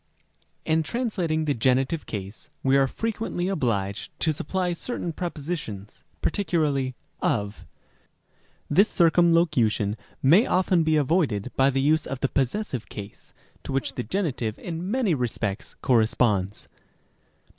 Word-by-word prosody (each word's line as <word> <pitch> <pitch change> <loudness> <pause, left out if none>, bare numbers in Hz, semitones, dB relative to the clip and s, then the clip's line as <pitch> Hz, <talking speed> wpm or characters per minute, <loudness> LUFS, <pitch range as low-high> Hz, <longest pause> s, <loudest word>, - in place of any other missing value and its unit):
In 160 0 +2
translating 170 - -1
the 145 - +1
genitive 135 +5 +1
case, 100 0 -7
we 135 0 +3
are 135 -1 +4
frequently 220 -1 -3
obliged 110 - -1
to 160 - +2
supply 180 +4 -1
certain 175 -2 -4
prepositions, 150 - -5 0.2
particularly 150 -9 0 0.3
of. 100 -1 -1 1.0
This 200 +3 +4
circumlocution 165 - +3 0.3
may 170 - +6
often 185 -1 +3
be 160 -1 +2
avoided 140 - +1
by 135 +1 +4
the 135 0 0
use 155 +3 +2
of 135 - -4
the 135 - +1
possessive 135 - -2
case, 100 -1 -9 0.3
to - - -6
which 135 0 -1
the - - -3
genitive 125 - -2
in 175 +1 -5
many 235 -5 +1
respects 120 -4 -2
corresponds. 110 -4 +2
145 Hz, 125 wpm, -25 LUFS, 115-175 Hz, 1.0 s, may